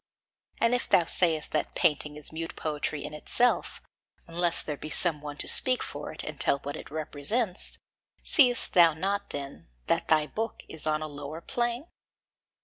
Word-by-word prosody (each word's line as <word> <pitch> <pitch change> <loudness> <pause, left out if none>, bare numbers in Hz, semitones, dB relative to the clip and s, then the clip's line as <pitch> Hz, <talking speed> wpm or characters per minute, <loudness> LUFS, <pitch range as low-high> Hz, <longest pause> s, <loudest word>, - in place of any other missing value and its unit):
And 230 +1 +2
if 245 - -1
thou 175 - +4
sayest 160 -2 +1
that 155 - -2
painting 150 -1 +1
is 150 - -5
mute 165 +1 -6
poetry 150 -1 -3
in - - -8
itself, 240 +10 +1 0.4
unless 170 0 +2
there 150 - -4
be 155 - -8
some 160 -2 +1
one 145 -1 -8
to - - +1
speak 255 -1 +5
for - - -7
it - - -9
and - - -8
tell - - +2
what 145 +1 -5
it - - -10
represents 160 - -2 0.5
seest 250 -4 +5
thou 170 -3 +6
not, 200 +4 -2
then, 140 - -7 0.2
that - - 0
thy 155 -1 +3
book 225 +8 -5
is 160 -1 -3
on 155 0 0
a - - -4
lower 145 +1 -8
plane? 240 - -3
160 Hz, 175 wpm, -27 LUFS, 150-200 Hz, 0.5 s, thou